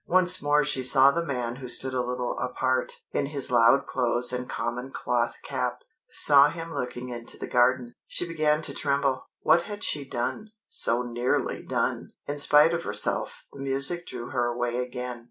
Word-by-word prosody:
Once 180 Hz, 0 st, +3 dB
more 145 Hz, 0 st, +3 dB
she 135 Hz, -2 st, +1 dB
saw 135 Hz, +1 st, +5 dB
the 170 Hz, +3 st, -1 dB
man 125 Hz, -5 st, -3 dB
who 130 Hz, -1 st, -8 dB
stood 130 Hz, +2 st, -2 dB
a 125 Hz, -, 0 dB
little 125 Hz, 0 st, -3 dB
apart, 130 Hz, 0 st, -1 dB, 0.2 s
in 140 Hz, -, -1 dB
his 140 Hz, -3 st, -3 dB
loud 120 Hz, +3 st, +5 dB
clothes 120 Hz, -1 st, +1 dB
and 125 Hz, 0 st, -4 dB
common 120 Hz, +3 st, -3 dB
cloth 120 Hz, -2 st, -1 dB
cap, 125 Hz, -3 st, -3 dB, 0.3 s
saw 145 Hz, 0 st, +6 dB
him 165 Hz, +1 st, -7 dB
looking 125 Hz, 0 st, -4 dB
into 120 Hz, -1 st, -6 dB
the -, -, -5 dB
garden. 125 Hz, 0 st, +2 dB
She 175 Hz, -, -3 dB
began 155 Hz, -2 st, +1 dB
to -, -, +1 dB
tremble. 140 Hz, -2 st, 0 dB
What 170 Hz, -, +4 dB
had 205 Hz, +1 st, -6 dB
she 145 Hz, -, -1 dB
done 140 Hz, -, -4 dB
so 120 Hz, +2 st, 0 dB
nearly 120 Hz, +1 st, -1 dB
done! -, -, -2 dB, 0.2 s
In 145 Hz, 0 st, -4 dB
spite 150 Hz, +3 st, +5 dB
of 170 Hz, 0 st, -2 dB
herself, 105 Hz, 0 st, -2 dB
the 140 Hz, -, -11 dB
music 140 Hz, +6 st, +2 dB
drew 120 Hz, -1 st, -7 dB
her 125 Hz, -2 st, 0 dB
away 120 Hz, 0 st, -2 dB
again. 125 Hz, -1 st, -4 dB
130 Hz, 180 wpm, -26 LUFS, 125-145 Hz, 0.3 s, saw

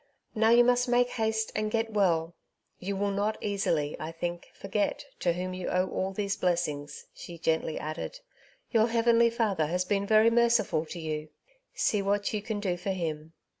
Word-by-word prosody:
Now 220 Hz, 0 st, +3 dB
you 240 Hz, +1 st, +7 dB
must 245 Hz, +1 st, +2 dB
make 245 Hz, 0 st, +3 dB
haste 220 Hz, -2 st, -1 dB
and 215 Hz, 0 st, 0 dB
get 225 Hz, 0 st, -1 dB
well. 170 Hz, -5 st, +2 dB, 0.5 s
You 195 Hz, +2 st, -3 dB
will 200 Hz, +1 st, 0 dB
not 205 Hz, +2 st, -1 dB
easily, 165 Hz, -7 st, -1 dB
I 155 Hz, +1 st, -5 dB
think, 175 Hz, +1 st, -4 dB
forget 200 Hz, +6 st, -2 dB
to 175 Hz, -, +1 dB
whom 185 Hz, +1 st, -4 dB
you 185 Hz, -1 st, -5 dB
owe 185 Hz, +1 st, +1 dB
all 190 Hz, +1 st, -2 dB
these 200 Hz, 0 st, -2 dB
blessings," 155 Hz, -6 st, -2 dB
she 170 Hz, -, -9 dB
gently 160 Hz, -1 st, 0 dB
added. 155 Hz, -, -5 dB, 0.3 s
*' -, -, -33 dB
Your 225 Hz, -2 st, +4 dB
Heavenly 235 Hz, 0 st, +4 dB
Father 210 Hz, -9 st, 0 dB
has 180 Hz, +3 st, -1 dB
been 200 Hz, +1 st, 0 dB
very 220 Hz, +2 st, +5 dB
merciful 230 Hz, -9 st, +2 dB
to 175 Hz, -, -7 dB
you; 155 Hz, -1 st, -4 dB, 0.5 s
see 210 Hz, -, +1 dB
what 200 Hz, +2 st, 0 dB
you 210 Hz, -, -1 dB
can 215 Hz, 0 st, -3 dB
do 185 Hz, -4 st, -1 dB
for 180 Hz, +3 st, -5 dB
Him." 160 Hz, -4 st, -3 dB
200 Hz, 185 wpm, -29 LUFS, 170-220 Hz, 0.5 s, you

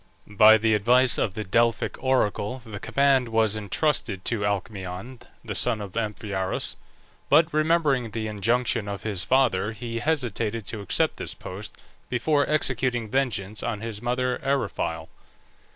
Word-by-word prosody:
By 110 Hz, +2 st, +6 dB
the 110 Hz, 0 st, +2 dB
advice 120 Hz, +4 st, +4 dB
of 95 Hz, -, -1 dB
the 110 Hz, -, -3 dB
Delphic 115 Hz, +5 st, 0 dB
oracle 125 Hz, -3 st, +1 dB
the 105 Hz, -3 st, -7 dB
command 135 Hz, -2 st, +2 dB
was 110 Hz, -2 st, +3 dB
intrusted 105 Hz, -, -1 dB
to 115 Hz, -4 st, 0 dB
Alcmaeon, 100 Hz, +3 st, -4 dB, 0.3 s
the -, -, -4 dB
son 110 Hz, -, +1 dB
of 100 Hz, -3 st, -8 dB
Amphiaraus; 105 Hz, -4 st, -2 dB, 0.5 s
but 155 Hz, +3 st, +4 dB
remembering 155 Hz, -6 st, +2 dB
the 110 Hz, +1 st, -4 dB
injunction 110 Hz, +1 st, 0 dB
of 100 Hz, -1 st, -5 dB
his 100 Hz, -5 st, -2 dB
father 115 Hz, -6 st, +2 dB
he 115 Hz, +1 st, -5 dB
hesitated 115 Hz, -6 st, -1 dB
to 110 Hz, 0 st, -4 dB
accept 100 Hz, -, 0 dB
this -, -, -5 dB
post 100 Hz, +3 st, -8 dB, 0.3 s
before 145 Hz, +4 st, +1 dB
executing 125 Hz, -6 st, 0 dB
vengeance 110 Hz, -6 st, -1 dB
on 105 Hz, -3 st, -3 dB
his 115 Hz, -2 st, -5 dB
mother 125 Hz, +1 st, -1 dB
Eriphyle. 105 Hz, -12 st, -2 dB
115 Hz, 140 wpm, -25 LUFS, 105-130 Hz, 0.5 s, By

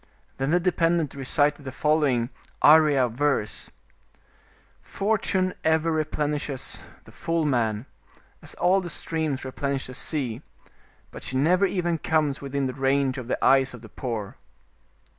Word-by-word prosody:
Then 135 Hz, +1 st, -1 dB
the 175 Hz, +3 st, +3 dB
de 180 Hz, +1 st, +1 dB
pendent 165 Hz, -3 st, +1 dB
recited 145 Hz, +2 st, +1 dB
the 135 Hz, -, -6 dB
following 140 Hz, -5 st, +1 dB, 0.3 s
Arya 150 Hz, -4 st, +6 dB
verse 125 Hz, -2 st, -1 dB, 0.4 s
— -, -, -35 dB
'* -, -, -32 dB, 0.2 s
Fortune 195 Hz, -3 st, 0 dB
ever 160 Hz, +1 st, +2 dB
replenishes 150 Hz, -3 st, -2 dB, 0.2 s
the -, -, -16 dB
full 165 Hz, -1 st, -1 dB
man, 115 Hz, -5 st, 0 dB, 0.6 s
as -, -, -11 dB
all 190 Hz, +2 st, +3 dB
the 175 Hz, -, -6 dB
streams 155 Hz, -4 st, -3 dB
replenish 140 Hz, +1 st, -2 dB
the 130 Hz, -, -8 dB
sea, 130 Hz, -4 st, -3 dB, 0.7 s
but -, -, -9 dB
she 130 Hz, -, -2 dB
never 180 Hz, +8 st, +3 dB
even 175 Hz, -3 st, -1 dB
comes 150 Hz, -4 st, 0 dB
within 140 Hz, 0 st, -2 dB
the 130 Hz, -, -2 dB
range 135 Hz, -1 st, +1 dB
of 125 Hz, -, -8 dB
the -, -, -1 dB
eyes 135 Hz, -1 st, +4 dB
of 120 Hz, -, -13 dB
the 110 Hz, -, -11 dB
poor." 110 Hz, -6 st, -5 dB
145 Hz, 150 wpm, -25 LUFS, 130-160 Hz, 0.7 s, Arya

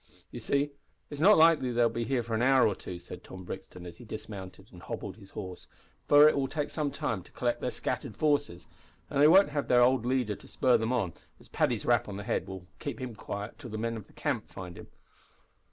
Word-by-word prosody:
"You -, -, -7 dB
see, 140 Hz, +1 st, 0 dB, 0.4 s
it's 145 Hz, 0 st, -5 dB
not 205 Hz, +5 st, +7 dB
likely 160 Hz, -6 st, +5 dB
they'll 120 Hz, 0 st, +3 dB
be 115 Hz, 0 st, -3 dB
here 130 Hz, -2 st, 0 dB
for 115 Hz, 0 st, -5 dB
an 110 Hz, -, +1 dB
hour 130 Hz, +1 st, +5 dB
or 105 Hz, -, +1 dB
two," 90 Hz, -1 st, -8 dB
said 90 Hz, +1 st, -10 dB
Tom 95 Hz, 0 st, -10 dB
Brixton, 90 Hz, 0 st, -8 dB
as 85 Hz, -1 st, -9 dB
he -, -, -12 dB
dismounted 105 Hz, -4 st, -8 dB
and -, -, -12 dB
hobbled -, -, -6 dB
his 100 Hz, -3 st, -14 dB
horse, 95 Hz, -2 st, -8 dB, 0.4 s
"for 145 Hz, +1 st, +8 dB
it 155 Hz, -, +4 dB
will 135 Hz, -1 st, 0 dB
take 150 Hz, +1 st, -3 dB
some 150 Hz, -2 st, -1 dB
time 110 Hz, -7 st, -3 dB
to -, -, -18 dB
collect 120 Hz, -1 st, -1 dB
their -, -, -1 dB
scattered -, -, -4 dB
forces, 145 Hz, -, 0 dB, 0.5 s
and 140 Hz, -, +1 dB
they 150 Hz, -, +8 dB
won't 190 Hz, +3 st, +7 dB
have 145 Hz, -1 st, -2 dB
their 125 Hz, -1 st, +5 dB
old 125 Hz, -1 st, +3 dB
leader 125 Hz, -4 st, 0 dB
to -, -, -15 dB
spur 130 Hz, -2 st, +3 dB
them 110 Hz, +2 st, +1 dB
on, 110 Hz, -9 st, 0 dB, 0.3 s
as -, -, -18 dB
Paddy's -, -, 0 dB
rap -, -, +2 dB
on 100 Hz, -, -5 dB
the 100 Hz, -, -6 dB
head -, -, -1 dB
will 95 Hz, -1 st, -8 dB
keep 145 Hz, -, -5 dB
him 130 Hz, -2 st, -5 dB
quiet 105 Hz, 0 st, -6 dB
till 130 Hz, -, -8 dB
the 110 Hz, -, -5 dB
men 115 Hz, +1 st, -2 dB
of 110 Hz, -, -8 dB
the -, -, -22 dB
camp -, -, -2 dB
find 90 Hz, -2 st, -8 dB
him." -, -, -11 dB
120 Hz, 240 wpm, -29 LUFS, 100-140 Hz, 0.5 s, for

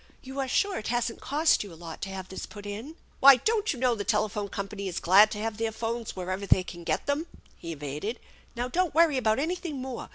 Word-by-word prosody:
You 265 Hz, +1 st, -7 dB
are 270 Hz, -, 0 dB
sure 395 Hz, +9 st, +1 dB
it 215 Hz, -, -6 dB
hasn't 240 Hz, -1 st, -1 dB
cost 300 Hz, 0 st, +2 dB
you 200 Hz, -, -10 dB
a -, -, -11 dB
lot 165 Hz, -1 st, -9 dB
to 195 Hz, -, -3 dB
have 190 Hz, -1 st, -6 dB
this 190 Hz, -, -6 dB
put 205 Hz, -1 st, -11 dB
in? 220 Hz, +10 st, -6 dB
" -, -, -33 dB
" -, -, -33 dB
Why, 275 Hz, 0 st, +10 dB
don't 435 Hz, -, +1 dB
you 280 Hz, -, -4 dB
know 250 Hz, 0 st, +2 dB
the 210 Hz, -3 st, -3 dB
telephone 210 Hz, 0 st, 0 dB
company 200 Hz, 0 st, -5 dB
is 180 Hz, -, -3 dB
glad 200 Hz, +5 st, +7 dB
to 210 Hz, -, -5 dB
have 215 Hz, 0 st, -3 dB
their 225 Hz, 0 st, -1 dB
phones 230 Hz, +1 st, -4 dB
wherever 185 Hz, +2 st, -4 dB
they 185 Hz, -, +5 dB
can 175 Hz, -1 st, -9 dB
get -, -, -1 dB
them? 290 Hz, +4 st, -1 dB
" -, -, -30 dB
he 165 Hz, -1 st, -6 dB
evaded. 150 Hz, -, -5 dB, 0.2 s
" -, -, -29 dB
Now, 240 Hz, +1 st, -2 dB
don't 345 Hz, +5 st, 0 dB
worry 325 Hz, -4 st, +5 dB
about 220 Hz, -3 st, +2 dB
anything 320 Hz, 0 st, -2 dB
more. 255 Hz, -1 st, -6 dB
225 Hz, 260 wpm, -28 LUFS, 195-270 Hz, 0.2 s, Why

